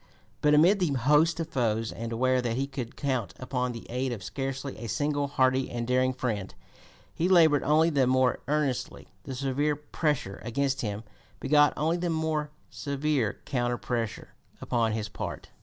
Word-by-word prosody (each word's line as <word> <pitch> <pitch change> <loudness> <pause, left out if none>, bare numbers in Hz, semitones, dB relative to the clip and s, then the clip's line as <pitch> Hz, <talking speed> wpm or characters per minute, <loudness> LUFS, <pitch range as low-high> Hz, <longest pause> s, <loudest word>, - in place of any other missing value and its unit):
But 150 0 +5
amid 180 +7 +5
the 180 - +2
host 150 +6 +3
of 165 -1 -3
foes, 115 -4 0
and 115 0 -6
aware 130 +2 +2
that 120 -2 -1
he 135 - 0
could 130 -4 -6
count 125 -10 -2
upon 125 -1 -2
the 115 -1 -8
aid 125 +2 -2
of 110 -6 -5
scarcely 135 +4 -4
a 115 - -6
single 145 +5 0
hearty 130 -1 +2
and 120 -1 -3
daring 130 +1 +2
friend, 115 -7 -3 0.6
he 175 +3 0
labored 160 -6 +6
only 155 +3 +3
the 135 -4 +3
more 130 -1 +3
earnestly. 145 -3 -1 0.2
The 130 - -5
severe 140 +3 0
pressure 145 -8 -2
against 135 +2 -1
him 105 -1 -3 0.4
begat 145 0 +4
only 160 +3 +1
the 175 0 -2
more 160 -2 -1 0.2
severe 140 -5 -1
counter 120 -3 -1
pressure 115 -3 -3 0.3
upon 115 -3 0
his 110 -1 -2
part. - - -6
130 Hz, 170 wpm, -28 LUFS, 120-150 Hz, 0.6 s, labored